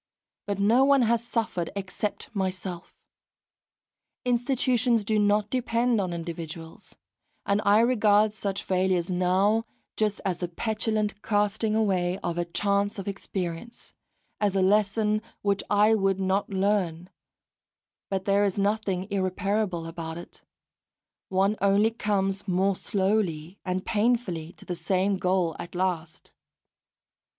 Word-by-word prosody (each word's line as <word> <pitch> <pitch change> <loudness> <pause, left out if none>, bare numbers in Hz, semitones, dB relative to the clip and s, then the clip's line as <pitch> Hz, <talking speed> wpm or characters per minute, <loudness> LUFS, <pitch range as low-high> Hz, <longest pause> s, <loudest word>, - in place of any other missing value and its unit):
But 200 -1 -1
no 220 +6 +4
one 275 -1 +5
has 235 0 +2
suffered 225 -8 -2
except 200 +3 -4
myself! 185 -2 -4 1.3
Institutions 245 -2 +2
do 215 +1 +1
not 205 0 +2
depend 240 -2 +1
upon 185 -3 -1
individuals; 165 -1 -7 0.5
and 200 +1 +1
I 205 +2 +5
regard 215 -3 +4
such 200 -1 -3
failures 185 -1 +1
now 190 +5 +2 0.3
just 210 -1 0
as 180 -3 -1
the 175 - -2
petulant 215 +2 -2
casting 215 +1 +1
away 185 -4 +1
of 175 0 -2
a 175 - 0
chance 200 +4 0
of 195 - -6
experience, 195 +2 -5 0.5
as 205 -2 +1
a 190 - +3
lesson 210 +2 +2 0.2
which 200 -1 +1
I 210 +2 +5
would 195 -3 +1
not 190 +1 0
learn; 190 -3 0 1.0
but 190 -1 -2
there 200 0 +3
is 200 -1 0
nothing 200 -2 0
irreparable 190 -1 -1
about 165 -1 -6
it; 170 - -11 0.9
one 195 +2 +2
only 200 +3 +4
comes, 200 -3 -1
more 190 +1 +2
slowly 190 -4 -1
and 185 0 -2
painfully, 210 -7 0
to - - -16
the 180 - -3
same 185 +3 0
goal 180 -3 +1
at 175 - -8
last. 175 -3 -3
200 Hz, 125 wpm, -27 LUFS, 185-215 Hz, 1.3 s, one